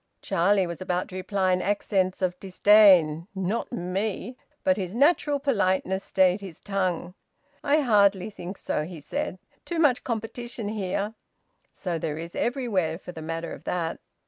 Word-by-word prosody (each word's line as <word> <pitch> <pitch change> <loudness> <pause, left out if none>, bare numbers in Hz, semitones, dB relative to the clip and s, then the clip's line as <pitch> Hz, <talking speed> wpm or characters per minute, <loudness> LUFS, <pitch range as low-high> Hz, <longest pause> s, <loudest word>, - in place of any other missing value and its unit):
Charlie 190 +3 +2
was 170 +1 -6
about 180 -1 -1
to 185 - -9
reply 185 0 0
in 180 - +1
accents 195 -2 0
of 180 -1 0
disdain: 185 -5 +5
"Not 190 +4 -2
me!" 210 +3 -3 0.3
But 280 -1 +4
his 190 0 -4
natural 290 +1 +3
politeness 190 -7 +1
stayed 190 +1 +2
his 190 -5 -9
tongue. 185 -3 -2 0.5
"I 295 +2 +3
hardly 205 -5 +3
think 185 0 -7
so," 150 - -2
he 170 +1 -8
said. 150 +5 -4 0.3
"Too 340 - -4
much 290 -6 +3
competition 230 -1 -4
here. 205 0 -2 0.6
So 175 -4 -3
there 155 -1 -3
is 170 +1 -7
everywhere, 210 - 0
for 180 - -9
the 160 - -9
matter 165 +1 -4
of - - -10
that." 170 -2 -2
190 Hz, 155 wpm, -26 LUFS, 180-215 Hz, 0.6 s, disdain